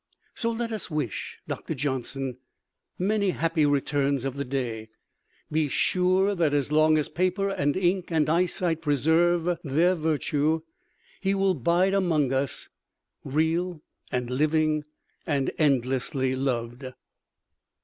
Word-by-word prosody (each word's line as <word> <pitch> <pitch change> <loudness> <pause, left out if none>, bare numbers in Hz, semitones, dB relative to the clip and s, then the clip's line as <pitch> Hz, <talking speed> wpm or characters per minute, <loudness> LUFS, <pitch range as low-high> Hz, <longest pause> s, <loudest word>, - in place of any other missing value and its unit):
So 230 - -1
let 230 0 -3
us 215 -4 -4
wish 150 - -3
Doctor 160 - -4
Johnson 130 -1 -3 0.6
many 200 +1 +1
happy 165 -3 +1
returns 140 -1 +1
of 135 -1 -3
the 140 - -2
day, 120 -5 -3 0.8
sure 185 +6 +2
that 165 -6 +1
as 145 0 0
long 155 0 +4
as 150 - 0
paper 185 +2 0
and 145 -4 0
ink 185 -1 0
and 160 -2 +2
eyesight 170 0 +1
preserve 165 +4 +2
their 165 +5 +3
virtue 155 -1 0 0.6
he 195 0 0
will 195 -1 +2
bide 175 +6 +2
among 160 -9 +2
us, 135 0 -2 0.6
real 160 +3 -1 0.3
and 125 0 -2
living 155 +2 +1 0.4
and 140 -3 0
endlessly 130 -1 +1
loved. 125 -1 -2
155 Hz, 120 wpm, -26 LUFS, 135-180 Hz, 0.8 s, long